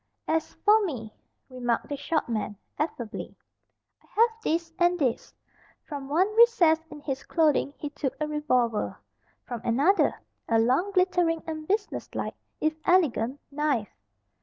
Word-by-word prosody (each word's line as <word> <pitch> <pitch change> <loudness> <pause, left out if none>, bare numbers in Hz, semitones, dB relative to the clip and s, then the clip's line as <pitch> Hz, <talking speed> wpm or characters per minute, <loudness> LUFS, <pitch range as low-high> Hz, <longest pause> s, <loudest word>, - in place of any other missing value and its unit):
"As 320 0 -1
for 430 +1 +6
me," 235 - -4 0.3
remarked 245 -3 -2
the 290 - -3
short 305 +3 -1
man, 215 -3 -3 0.2
affably, 250 -7 -4 0.6
"I - - -27
have 465 0 +6
this, 330 -1 -1
and 350 0 +4
this." 260 -8 -1 0.5
From 280 -3 -7
one 345 +6 +3
recess 455 -10 +6
in 295 -1 -10
his 270 -2 -3
clothing 300 -3 +1
he 295 - -5
took 285 -2 -3
a 305 - -1
revolver. 255 -7 0 0.5
From 240 -3 -6
another, 285 +13 +3 0.3
a 225 - +4
long, 255 - +2
glittering, 360 -3 +2
and 310 -1 -5
business 410 +1 -1
like, - - -2 0.3
if 310 0 +1
elegant, 285 -7 +2
knife. 280 -8 -1
300 Hz, 140 wpm, -27 LUFS, 255-345 Hz, 0.6 s, for